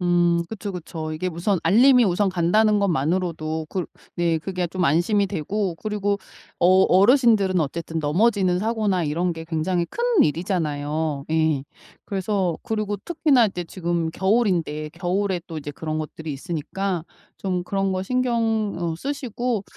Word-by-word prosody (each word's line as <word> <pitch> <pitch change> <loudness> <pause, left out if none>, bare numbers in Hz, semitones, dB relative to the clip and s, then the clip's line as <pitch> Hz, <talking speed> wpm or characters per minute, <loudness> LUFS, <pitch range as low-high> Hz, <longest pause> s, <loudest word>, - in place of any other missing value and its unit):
음 175 -1 +3
그쵸, 210 -2 -5
그쵸. 160 -2 -6
이게 185 +4 -2
우선 175 +3 0
알림이 245 +8 +6
우선 195 +1 +2
간다는 210 +5 +3
것만으로도 160 -2 -1
그 185 0 -2 0.3
네 170 -2 +1
그게 180 +1 -3
좀 180 +2 -2
안심이 175 +7 +2
되고 190 +1 -2
그리고 205 -1 -1 0.4
어 - - +4 0.2
어르신들은 200 - +4
어쨌든 165 +2 -3
넘어지는 180 +4 +2
사고나 210 -4 0
이런 170 +4 0
게 160 -1 -7
굉장히 170 +2 -1
큰 475 - -4 0.2
일이잖아요. 155 -3 -1
예. 160 -3 +2 0.4
그래서 190 -3 -1
그리고 215 -2 -2
특히나 275 - +2
이제 180 -3 -4
지금 170 -2 -2
겨울인데 180 -7 0
겨울에 180 +2 -1
또 165 - -7
이제 145 0 -6
그런 155 +1 -4
것들이 155 0 -5
있으니까 170 +4 -3 0.3
좀 185 -2 -2
그런 195 +1 -1
거 185 0 -1
신경 230 -3 0
어 170 -2 -2
쓰시고 245 - -3
180 Hz, 320 characters per minute, -23 LUFS, 160-205 Hz, 0.4 s, 알림이